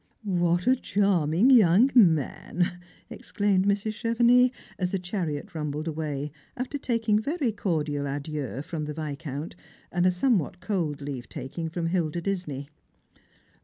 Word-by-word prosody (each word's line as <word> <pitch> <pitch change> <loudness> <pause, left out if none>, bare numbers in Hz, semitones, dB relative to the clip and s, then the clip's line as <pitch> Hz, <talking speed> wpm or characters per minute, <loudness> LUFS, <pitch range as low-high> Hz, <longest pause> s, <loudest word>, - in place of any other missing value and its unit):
" - - -41
What 175 -2 +1
a 255 - +5
charming 195 - +2
young 225 +2 +6
man! 175 - +2 0.2
" - - -31
exclaimed 200 -2 0
Mrs. 205 +2 +1
Chevenix, 240 +3 +4 0.3
as 180 -2 0
the 195 - -1
chariot 180 -6 -4
rumbled 150 0 -3
away, 150 -2 -3 0.3
after 260 +3 -3 0.4
very 285 -3 0
cordial 150 -8 -1
adieux 140 -1 -4
from 160 -1 -4
the 150 0 -5
Viscount, 150 0 -5 0.4
and 175 +1 +2
a - - +6
somewhat 180 - +1
cold 175 -7 -2
leave 140 -4 -6
taking 155 +4 -5
from 170 +1 -3
Hilda 170 -1 0
Disney. 170 -7 -3
175 Hz, 135 wpm, -27 LUFS, 150-200 Hz, 0.4 s, young